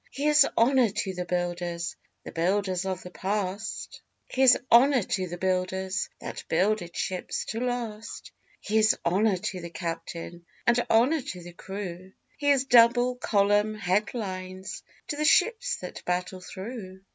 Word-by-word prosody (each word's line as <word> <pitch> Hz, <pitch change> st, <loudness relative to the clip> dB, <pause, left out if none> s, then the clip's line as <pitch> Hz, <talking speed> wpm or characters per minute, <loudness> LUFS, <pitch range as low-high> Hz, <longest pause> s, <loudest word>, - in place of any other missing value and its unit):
Here's 295 Hz, +1 st, +4 dB
honour 250 Hz, 0 st, +4 dB
to 190 Hz, -1 st, -3 dB
the 180 Hz, 0 st, -4 dB
builders 175 Hz, -1 st, -2 dB, 0.3 s
The -, -, -8 dB
builders 185 Hz, +2 st, 0 dB
of 185 Hz, -1 st, -3 dB
the 180 Hz, -, -9 dB
past; 200 Hz, +2 st, -3 dB, 0.3 s
Here's 260 Hz, -1 st, +5 dB
honour 255 Hz, 0 st, +6 dB
to 185 Hz, 0 st, -2 dB
the 175 Hz, 0 st, -6 dB
builders 185 Hz, +1 st, -1 dB
That -, -, -7 dB
builded 185 Hz, 0 st, +1 dB
ships 185 Hz, -1 st, -3 dB
to 225 Hz, -, -3 dB
last; 235 Hz, -3 st, -4 dB, 0.3 s
Here's 220 Hz, +1 st, +3 dB
honour 195 Hz, +3 st, +2 dB
to 185 Hz, -1 st, -4 dB
the 170 Hz, -, -7 dB
captain, 170 Hz, 0 st, -6 dB, 0.2 s
And 235 Hz, 0 st, +3 dB
honour 260 Hz, +8 st, +4 dB
to 180 Hz, -7 st, -7 dB
the 175 Hz, 0 st, -10 dB
crew; 190 Hz, 0 st, -7 dB, 0.3 s
Here's 285 Hz, -3 st, +3 dB
double 245 Hz, 0 st, +5 dB
column 205 Hz, -1 st, +2 dB
head 205 Hz, +3 st, 0 dB
lines 185 Hz, -3 st, -5 dB, 0.3 s
To 290 Hz, -, -2 dB
the 305 Hz, -, 0 dB
ships 450 Hz, +10 st, +3 dB
that 180 Hz, -, -8 dB
battle 180 Hz, +1 st, -2 dB
through. 190 Hz, 0 st, -8 dB
195 Hz, 145 wpm, -27 LUFS, 180-235 Hz, 0.3 s, honour